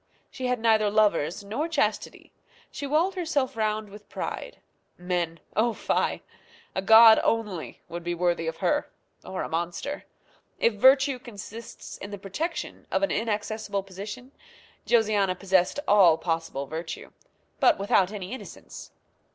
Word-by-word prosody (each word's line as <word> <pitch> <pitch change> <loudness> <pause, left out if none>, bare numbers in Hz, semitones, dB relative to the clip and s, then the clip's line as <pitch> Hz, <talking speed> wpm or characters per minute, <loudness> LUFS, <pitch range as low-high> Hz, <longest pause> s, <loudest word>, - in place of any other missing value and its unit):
She 255 -1 -4
had 250 -1 0
neither 220 -2 +3
lovers 205 -4 +2
nor 225 +11 -2
chastity. 335 - -2 0.4
She 285 - -5
walled 325 +7 +2
herself 320 -9 -1
round 215 -1 -1
with 210 +1 -14
pride. - - -5 0.4
Men! 175 -2 -2 0.2
oh, 230 +2 +2
fie! - - -1 0.5
a 190 - -1
god 225 +1 +9
only 210 -7 -2
would 170 0 -6
be 175 0 -2
worthy 175 -1 0
of 165 0 -3
her, 295 0 +1 0.3
or 190 - -4
a - - -3
monster. 175 - -3 0.5
If 230 - +2
virtue 265 +4 +5
consists 225 -1 -9
in 200 - -7
the 205 - -6
protection 250 - -5
of - - 0
an 295 - +2
inaccessible 215 -2 -2
position, 205 +7 -8 0.6
Josiana 210 -5 +3
possessed 190 +4 +1
all 185 -6 +6
possible 165 -5 -2
virtue, 160 +3 -6 0.5
but 345 - +5
without 195 -1 +2
any 195 -2 -6
innocence. 260 - -9
210 Hz, 140 wpm, -26 LUFS, 180-240 Hz, 0.6 s, god